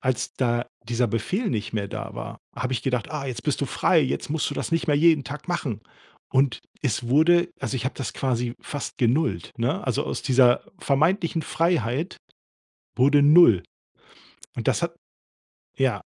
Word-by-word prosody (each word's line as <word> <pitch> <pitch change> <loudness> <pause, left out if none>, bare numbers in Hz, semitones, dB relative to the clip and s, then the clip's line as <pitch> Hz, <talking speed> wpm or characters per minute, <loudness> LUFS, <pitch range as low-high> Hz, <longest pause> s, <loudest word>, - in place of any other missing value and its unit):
als 130 -3 -1
da 120 -2 0 0.2
dieser 120 +1 +1
Befehl 115 - -1
nicht 110 - -3
mehr 100 -3 -2
da - - -6
war, - - -7 0.2
habe 130 +1 -3
ich 120 - -2
gedacht: 125 -4 -1
„Ah, 150 -3 -4
jetzt 120 -2 -5
bist 150 - -1
du 140 - 0
frei, 165 +5 +3
jetzt 140 0 -2
musst 155 -1 -1
du - - -4
das - - -3
nicht 165 - +1
mehr 145 -2 +3
jeden 160 -2 +4
Tag 150 +5 -8
machen.“ 135 - -2 0.5
Und 130 -4 +2 0.2
es 120 -3 -1
wurde 170 +6 +4
also, 135 - -2
ich 125 - -4
habe 130 - -2
das 130 -2 -4
quasi 120 -2 -1
fast 145 - -6
genullt, 120 - +1
ne? 135 +11 -1
Also, 130 +3 0
aus - - -4
dieser 125 -2 +4
vermeintlichen 165 +4 +1
Freiheit 165 -2 0 0.8
wurde 140 +3 +5
null 145 - +7 0.9
und - - -2
das - - +1
hat - - -1 0.8
ja. - - 0
135 Hz, 175 wpm, -24 LUFS, 120-155 Hz, 0.9 s, null